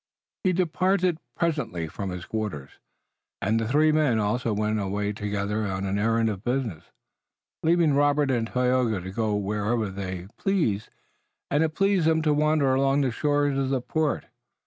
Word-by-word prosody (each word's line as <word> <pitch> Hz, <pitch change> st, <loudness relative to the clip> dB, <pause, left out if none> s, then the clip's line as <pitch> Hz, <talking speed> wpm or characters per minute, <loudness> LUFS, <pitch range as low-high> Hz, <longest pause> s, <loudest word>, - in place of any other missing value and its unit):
He 185 Hz, -, +3 dB
departed 180 Hz, 0 st, +1 dB, 0.2 s
presently 150 Hz, -, -1 dB
for 95 Hz, +5 st, -5 dB
his 90 Hz, -1 st, -5 dB
quarters, 105 Hz, -11 st, -4 dB, 0.7 s
and 110 Hz, +3 st, +1 dB
the 115 Hz, -, -1 dB
three 150 Hz, +5 st, +4 dB
men 150 Hz, -7 st, +2 dB
also 115 Hz, +3 st, 0 dB
went 105 Hz, +1 st, 0 dB
away 100 Hz, +1 st, -2 dB
together 105 Hz, +1 st, -2 dB
on 95 Hz, 0 st, -3 dB
an 100 Hz, +1 st, -1 dB
errand 115 Hz, +1 st, +2 dB
of 100 Hz, -2 st, -3 dB
business, 120 Hz, -, -2 dB, 0.8 s
leaving 165 Hz, -2 st, +3 dB
Robert 145 Hz, 0 st, +3 dB
and 115 Hz, -3 st, 0 dB
Tayoga 125 Hz, -4 st, +1 dB
to 95 Hz, +1 st, -7 dB
go 110 Hz, 0 st, 0 dB
whithersoever 105 Hz, +1 st, -1 dB
they 95 Hz, -2 st, -5 dB
pleased 155 Hz, -, 0 dB, 0.6 s
and 145 Hz, +3 st, +3 dB
it 160 Hz, -1 st, -1 dB
pleased 195 Hz, -4 st, +2 dB
them 160 Hz, -1 st, +3 dB
to 150 Hz, -1 st, +3 dB
wander 150 Hz, -2 st, +2 dB
along 135 Hz, +1 st, +2 dB
the 130 Hz, -3 st, +1 dB
shores 145 Hz, +1 st, +1 dB
of 135 Hz, -1 st, 0 dB
the 135 Hz, -1 st, +1 dB
port. 155 Hz, +4 st, -1 dB
120 Hz, 165 wpm, -26 LUFS, 105-150 Hz, 0.8 s, three